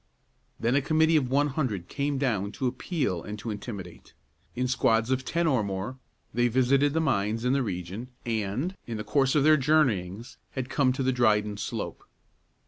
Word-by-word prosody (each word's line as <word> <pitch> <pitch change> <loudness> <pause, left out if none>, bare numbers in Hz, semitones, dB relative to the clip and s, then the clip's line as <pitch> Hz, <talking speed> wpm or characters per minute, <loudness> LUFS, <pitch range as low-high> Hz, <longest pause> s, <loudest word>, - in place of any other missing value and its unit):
Then 115 +2 +1
a 140 - +3
committee 160 +3 +3
of 135 -5 +2
one 145 +3 +2
hundred 125 - -2
came 140 0 -1
down 105 -7 0
to 130 - -3
appeal 130 - -1
and 105 +4 -6
to 110 +2 -5
intimidate. 100 -5 -8 0.4
In 125 +1 0
squads 115 -2 +2
of 130 0 +1
ten 170 +5 0
or 130 -8 +2
more 100 +6 -4 0.3
they 120 +1 +3
visited 135 +4 +3
the 160 - +2
mines 110 -5 0
in 125 - +3
the 140 - +2
region, 95 +2 -4 0.2
and, 115 - -2
in 115 -2 -4
the 105 - -4
course 135 +4 +2
of 145 - +4
their 155 +1 +6
journeyings, 120 - +1
had 130 -2 -4
come 135 -1 +3
to 130 - -2
the 130 - +2
Dryden 105 -4 +2
Slope. 100 - -5
125 Hz, 185 wpm, -27 LUFS, 105-140 Hz, 0.4 s, their